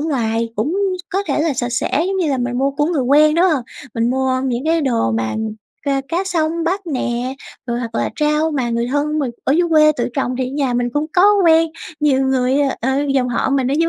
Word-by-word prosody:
ngoài 230 -7 -1
cũng 295 - -1 0.3
có 390 +1 0
thể - - 0
là 320 -3 +1
sạch 245 -1 -2
sẽ, 285 +6 0
giống 385 0 -1
như 335 -6 0
là 265 - 0
mình 245 0 -2
mua 275 +1 +1
của 295 +2 0
người 320 -6 0
quen, 300 +4 +4
đúng 345 +2 +3
hông? 310 -9 +2 0.3
Mình 230 +1 +1
mua 260 0 0
những 250 +1 -2
cái 325 +1 +2
đồ 235 - +1
mà 110 0 -1 0.5
ca 275 -2 0
cá 355 +5 -1
sông 335 -2 -1
bắt 375 +4 0
nè 255 -3 -2 0.3
rồi 240 0 -2
hoặc 230 -2 -5
là - - -1
rau 300 +1 +2
mà 260 -6 -1
người 235 +1 -1
thân 295 +3 -1
mình 270 -5 -1
ở 270 - +2
dưới 345 +2 +2
quê 305 -1 +5
tự 240 - -1
trồng 260 -2 -1
thì 260 - 0
ở 260 - -7
nhà 275 -4 -1
mình 245 0 0
cũng 295 +1 -1
có 360 - +4 0.2
quen, 325 0 +5 0.3
nhiều 280 -3 +3
người, 260 0 +1 0.2
ờ, 265 - 0 0.2
dòng 250 -2 +1
họ 245 - 0
mình 270 -1 +1
ở - - +1
dưới 330 - +2
275 Hz, 240 wpm, -18 LUFS, 245-315 Hz, 0.5 s, quê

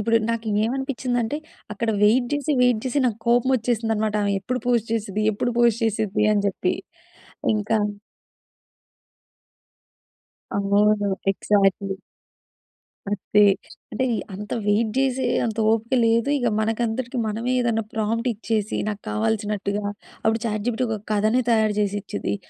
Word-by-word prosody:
ఇప్పుడు 230 +2 +2
నాకు 230 -1 -3 0.2
ఏమనిపిచ్చింది 255 0 -1
అంటే, 225 +6 -2 0.4
అక్కడ 225 +3 -3
వెయిట్ 235 +4 +4
చేసి 290 +1 -1
వెయిట్ 245 -3 +3
చేసి 260 +2 0
నాకు 225 -3 -1
కోపం 240 +2 +3
వచ్చేసింది 230 -1 -1
అన్నమాట. 215 0 0
ఆమె 200 0 +1
ఎప్పుడు 255 0 -2
పోస్ట్ 235 -2 +1
చేసిద్ది, 215 -1 -2
ఎప్పుడు 245 +4 -1
పోస్ట్ 235 -1 +3
చేసిద్ది 215 -1 0
అని 205 -1 +1
చెప్పి. 195 - -1 0.8
ఇంకా 215 +1 0 2.8
అవును. 205 0 +2 0.2
ఎగ్జాక్ట్‌లీ. 195 -1 +1 1.1
అంతే. 205 +1 +2 0.5
అంటే 260 +4 0 0.3
అంత 210 +2 -7 0.2
వెయిట్ 215 +2 +2
చేసే 265 -1 +1 0.2
అంత 220 -1 -3
ఓపిక 225 +3 0
లేదు. 230 +3 +2
ఇక 245 - +1
మనకందరికి 230 +3 -1
మనమే 225 +3 -2
ఏదైనా 230 -2 +1
ప్రాంప్ట్ 225 +2 -1
ఇచ్చేసి 215 -1 -2
నాకు 205 -2 -3
కావాల్సినట్టుగా, 205 - -1 0.4
అప్పుడు 220 +1 +2
చాట్ 215 -2 -2
జీపీటి 245 +1 0
ఒక 220 -1 -2
కథనే 215 +4 +2
తయారు 220 -2 +2
చేసి 205 -1 0
ఇచ్చిద్ది. 205 +1 -3
220 Hz, 130 wpm, -23 LUFS, 210-240 Hz, 2.8 s, వెయిట్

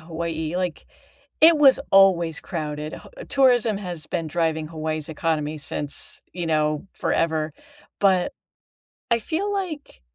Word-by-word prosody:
Hawaii, 160 0 -4
like, 180 -4 -3 0.5
it 320 0 +8
was 275 -3 +7
always 180 -5 +4
crowded, 150 -3 -5
h - - -12
tourism 245 -6 +3
has 175 -6 -6
been 165 - -3
driving 160 -1 -1
Hawaii's 155 -1 -3
economy 155 -1 -2
since, 145 0 -2
you 175 -2 -4
know, 155 0 0
forever. 160 -2 0 0.5
But, 195 +5 +3 0.8
I 235 - +4
feel 345 - -2
like, 355 - -5
165 Hz, 125 wpm, -23 LUFS, 155-215 Hz, 0.8 s, it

